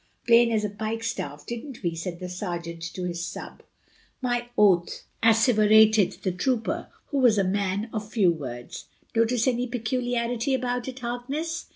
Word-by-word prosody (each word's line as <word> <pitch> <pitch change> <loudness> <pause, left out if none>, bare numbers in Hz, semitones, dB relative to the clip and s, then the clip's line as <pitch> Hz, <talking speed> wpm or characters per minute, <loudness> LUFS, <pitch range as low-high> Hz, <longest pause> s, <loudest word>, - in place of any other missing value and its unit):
"Plain 235 0 +6
as 215 -2 +1
a - - -1
pikestaff, 220 -9 -4
didn't 240 0 -7
we?" 170 -2 0
said 170 +1 -5
the 180 - -5
sergeant 175 -2 -5
to 185 - -4
his 170 -1 -3
sub. - - -7 0.6
"My 245 -2 -1
oath!" 185 -5 +3 0.2
asseverated 220 -2 +5
the 185 - +1
trooper, 225 +6 -1 0.2
who 280 - 0
was 240 -5 +5
a 200 - +3
man 200 +2 -1
of 215 -1 -4
few 195 -7 +4
words. 125 -7 -7 0.3
"Notice 230 +2 +2
any 250 0 +1
peculiarity 245 +1 -1
about 245 -1 -2
it, 260 -1 -6
Harkness?" 275 +8 -4
220 Hz, 155 wpm, -26 LUFS, 185-245 Hz, 0.6 s, Plain